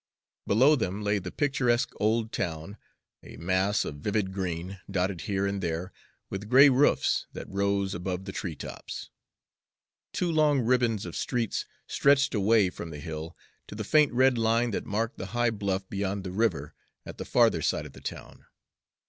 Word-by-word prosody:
Below 130 +9 +5
them 105 -5 -2
lay 105 0 +1
the - - -7
picturesque 130 -5 +1
old 110 +1 +1
town, 80 +4 -4 0.4
a - - -12
mass 95 +4 +1
of 75 - -5
vivid 100 +4 -1
green, 90 0 -4
dotted 95 -2 -1
here 100 -1 0
and 100 0 -2
there 85 +1 -3 0.3
with 100 +2 -6
gray 135 +3 +8
roofs 135 +2 +2
that - - -7
rose 100 0 0
above 90 +1 -4
the 95 - -5
tree 90 -5 -4
tops. - - -8 1.0
Two 175 -2 -1
long 150 -4 +3
ribbons 120 -4 +1
of 85 - -7
streets 120 -4 -1 0.2
stretched 140 -1 +3
away 105 -2 +3
from 85 - -7
the 75 -2 -8
Hill 80 +1 -6 0.3
to - - -9
the 110 - -4
faint 150 +6 +4
red 130 0 +3
line 115 +1 +2
that - - -3
marked 110 +3 -2
the 95 - -4
high 120 -1 +3
bluff 100 -3 -2
beyond 100 0 -3
the 95 - -5
river 90 -9 0 0.3
at - - -9
the - - -3
farther - - +3
side - - 0
of - - -11
the - - -13
town. - - -8
100 Hz, 175 wpm, -28 LUFS, 95-120 Hz, 1.0 s, gray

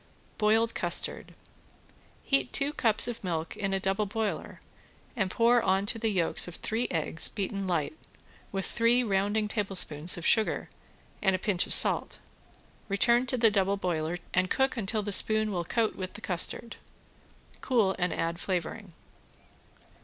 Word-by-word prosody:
~BOILED 225 +2 +2
CUSTARD~ - - 0 0.9
Heat 275 - 0
two 285 +1 -1
cups 225 -5 +2
of 240 -3 -6
milk 165 -3 -4
in 195 -2 -3
a 195 - 0
double 195 +2 -1
boiler 215 0 -4 0.6
and 195 -6 -1
pour 235 +4 +3
on 190 0 +1
to 225 - -1
the 225 0 0
yolks 180 -5 +1
of 175 - -8
three 230 +3 -2
eggs 160 -1 +4
beaten 195 -1 -4
light, 170 - -2 0.6
with 195 -1 -3
three 235 +2 +2
rounding 205 0 0
tablespoons 185 -7 0
of 170 - -7
sugar 220 -1 +1 0.5
and 190 -3 +2
a - - -1
pinch 185 -1 0
of - - +6
salt. - - +4 0.7
Return 235 +5 +2
to 255 - -2
the 225 -2 +4
double 200 0 +1
boiler 170 -3 -2 0.2
and 185 0 +1
cook 265 0 0
until 215 -1 -2
the 205 - -4
spoon 215 +2 +2
will 175 -3 -2
coat 225 +4 -1
with 185 -1 -6
the - - -9
custard. 190 +5 -1 0.8
Cool 220 -7 +1
and 180 0 0
add 165 +1 -3
flavoring. 185 +1 -4
200 Hz, 155 wpm, -28 LUFS, 185-225 Hz, 0.9 s, of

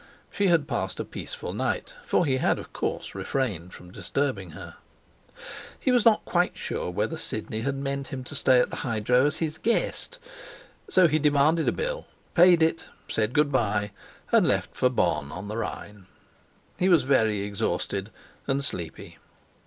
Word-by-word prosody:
She 200 -1 +1
had 165 -5 +3
passed 95 -9 -3
a - - -2
peaceful - - -6
night, - - -2
for 180 - +2
he 130 -3 +1
had, - - +2
of - - -10
course, - - -3
refrained 100 - -2
from 90 -1 -12
disturbing 110 -5 -2
her. - - -10 1.0
He 260 - +1
was 245 -2 +3
not 225 -2 +5
quite 175 0 +1
sure - - -3
whether 105 - -1
Sidney 110 -7 -3
had 135 +3 -1
meant 140 0 -3
him 130 -1 -6
to 125 - -9
stay 130 -1 +4
at - - +1
the - - -5
hydro 125 +2 +2
as 150 - -1
his 155 -2 -3
guest, 235 - -1 0.7
so 185 -2 +5
he 155 0 +1
demanded 150 +2 +3
a - - +4
bill, - - -3 0.3
paid 175 -1 +6
it, 160 0 +1 0.2
said 110 0 0
good 150 0 +3
bye, 105 -5 +1 0.4
and - - +5
left - - 0
for 125 - +3
Bonn 80 - 0
on 95 +5 -7
the 110 - -4
Rhine. 105 -4 -6 0.7
He 185 - +3
was 170 -7 +5
very 110 -6 +2
exhausted 100 0 -2 0.4
and 140 0 +1
sleepy. 85 - -6
135 Hz, 170 wpm, -26 LUFS, 105-160 Hz, 1.0 s, paid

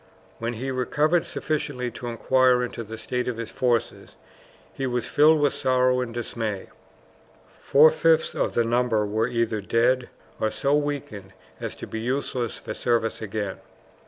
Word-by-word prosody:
When 115 +1 -2
he 130 +4 -4
recovered 155 +6 +1
sufficiently 140 -5 -2
to 120 - -7
inquire 125 +1 +3
into 120 -1 -5
the 110 +1 -8
state 125 +3 -3
of 125 -2 -2
his 115 -1 -5
forces, 120 -2 -1 0.6
he 135 - -3
was 125 -1 -1
filled 155 +1 +5
with 145 -1 +2
sorrow 130 0 +2
and 125 -2 -4
dismay. 115 -3 -4 0.8
Four 155 +3 +5
fifths 160 0 +2
of - - -1
the 120 - +2
number 115 -2 +1
were 110 +3 0
either 115 -3 -1
dead 120 +4 +1 0.3
or 110 - +1
so 125 +7 0
weakened 140 -10 -3 0.3
as - - -5
to - - -8
be 110 - -5
useless 125 -1 -2
for - - -6
service 115 -2 0
again. 105 -2 -4
125 Hz, 160 wpm, -25 LUFS, 115-130 Hz, 0.8 s, filled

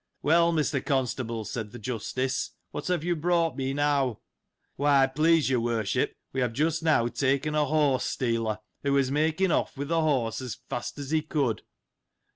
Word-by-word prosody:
Well, 170 +2 +4
Mr. 150 -4 0
Constable, 125 -4 -1
said 110 -2 -5
th' 120 - -9
Justice, 130 +3 -2 0.2
what - - -5
have 180 -4 0
you 175 0 0
brought 165 -2 +1
me, 135 0 -2
now? 140 -4 +1 0.6
Why, 140 -1 +4
please 155 +4 +3
your 130 -2 +2
Worship, 115 -4 0 0.2
we 130 - -1
have 125 -2 0
just 160 +5 0
now 155 -8 +3
taken 140 +4 0
a 150 -1 +2
horse 145 -3 +2
stealer, 115 -3 -1 0.2
who 140 0 0
was 135 -1 +2
making 160 +5 +1
off - - 0
with 140 +1 -4
the 165 -1 +2
horse 130 -7 0
as 125 -3 -5
fast 120 - -4
as 140 0 -6
he 160 -1 +3
could. 145 -7 -1
140 Hz, 175 wpm, -27 LUFS, 125-155 Hz, 0.6 s, Well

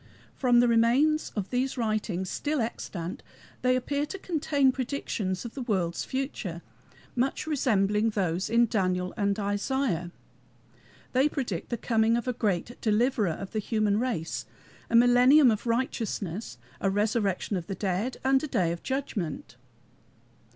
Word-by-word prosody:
From 245 -2 +4
the 245 - +4
remains 245 +7 +3
of 200 -3 -3
these 255 +2 0
writings, 215 -5 -1
still 295 +9 -2
extant, 185 -6 -4 0.4
they 255 0 +3
appear 285 +3 -1
to 390 - -6
contain 290 -7 +1
predictions 235 -8 -3
of 235 - -6
the 275 - -5
world's 185 -8 -1
future, 235 - -4 0.5
much 260 +4 0
resembling 220 -7 +2
those 185 -3 -1
of 235 +1 +4
Daniel 185 -3 0
and 200 -2 0
Isaiah. 205 - -1 1.0
They 265 +4 +4
predict 240 - -3
the 235 - -2
coming 225 0 +2
of 240 - -4
a 250 - +1
Great 215 0 -2
Deliverer 220 -1 +2
of 195 +4 -7
the 215 - -1
human 215 -1 +1
race, 225 -10 -2 0.4
a 230 - +1
millennium 245 +3 +7
of 215 +2 -3
righteousness, 225 - -2 0.2
a 195 - +1
resurrection 205 -1 0
of 175 -3 -4
the 195 - -3
dead, 195 +6 -2
and 265 0 +3
a - - -1
Day 175 - +1
of 170 - -5
Judgment. 240 - -4
225 Hz, 145 wpm, -28 LUFS, 195-255 Hz, 1.0 s, millennium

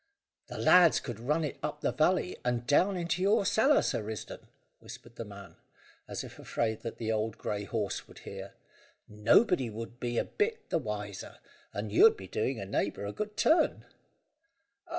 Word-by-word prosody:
"The - - -7
lads 180 -3 +6
could 120 -4 -7
run 150 +7 0
it 150 - -4
up 150 - -4
the - - +1
valley, 180 +3 +1
and 120 -1 -1
down 185 +8 +3
into 170 +1 -1
your 200 +1 +3
cellar, 265 +9 +4
Sir - - 0
Risdon," 105 0 -7 0.3
whispered 120 0 -12
the 115 - -5
man, 100 -1 -12 0.5
as - - -4
if - - -11
afraid 110 -2 -2
that 115 - -6
the 110 -1 -2
old 110 0 -1
grey 105 -1 -3
horse 105 -2 -3
would - - -16
hear; - - -9 0.5
"nobody 120 - +3
would 115 +2 -8
be 120 -1 -2
a - - +1
bit 445 +2 -2
the 165 - +2
wiser, 105 -5 -6 0.3
and 100 +1 -4
you'd 220 - +6
be 95 - -9
doing 115 +5 -1
a 100 - -5
neighbour 100 +1 -2
a 100 - -4
good 210 0 -5
turn." 325 - +3
120 Hz, 175 wpm, -30 LUFS, 105-180 Hz, 0.5 s, lads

